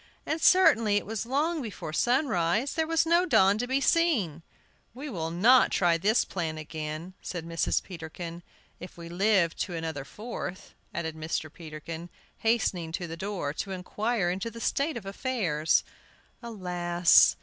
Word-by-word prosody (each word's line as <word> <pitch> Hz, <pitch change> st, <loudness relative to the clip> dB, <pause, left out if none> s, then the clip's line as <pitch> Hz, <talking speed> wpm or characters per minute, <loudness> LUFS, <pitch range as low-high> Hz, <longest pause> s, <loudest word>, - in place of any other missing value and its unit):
And 315 Hz, +1 st, -2 dB
certainly 285 Hz, -, +5 dB
it -, -, -2 dB
was 225 Hz, +1 st, -4 dB
long 305 Hz, +5 st, 0 dB
before 200 Hz, -, -6 dB
sunrise; 240 Hz, -, +1 dB
there 320 Hz, -1 st, 0 dB
was 330 Hz, 0 st, +2 dB
no 340 Hz, +2 st, +4 dB
dawn 200 Hz, -, +4 dB
to 245 Hz, -, -1 dB
be 265 Hz, +2 st, +1 dB
seen! 270 Hz, -, +2 dB, 0.5 s
"We 280 Hz, +2 st, -6 dB
will 165 Hz, -6 st, -3 dB
not 225 Hz, +10 st, +5 dB
try 170 Hz, -2 st, +2 dB
this 210 Hz, +6 st, +3 dB
plan 160 Hz, -4 st, -3 dB
again," 155 Hz, +3 st, -6 dB
said 175 Hz, -3 st, -5 dB
Mrs. 165 Hz, 0 st, 0 dB
Peterkin. 170 Hz, -1 st, -8 dB, 0.4 s
"If 180 Hz, -, -10 dB
we 170 Hz, -1 st, -9 dB
live 185 Hz, -1 st, +2 dB
to 180 Hz, -, -3 dB
another 160 Hz, -4 st, -4 dB
Fourth," 205 Hz, -, -7 dB, 0.2 s
added 160 Hz, -2 st, -4 dB
Mr. 155 Hz, -1 st, -3 dB
Peterkin, 160 Hz, +1 st, -8 dB, 0.3 s
hastening 200 Hz, -8 st, 0 dB
to 175 Hz, 0 st, -3 dB
the 165 Hz, -1 st, -6 dB
door 185 Hz, -5 st, -3 dB
to 195 Hz, -, -4 dB
inquire 195 Hz, +1 st, -1 dB
into 195 Hz, +5 st, -3 dB
the 230 Hz, +1 st, -10 dB
state 280 Hz, +4 st, 0 dB
of 215 Hz, -, -8 dB
affairs. 195 Hz, -, 0 dB, 0.6 s
Alas! 180 Hz, -6 st, +3 dB
185 Hz, 155 wpm, -28 LUFS, 165-235 Hz, 0.6 s, certainly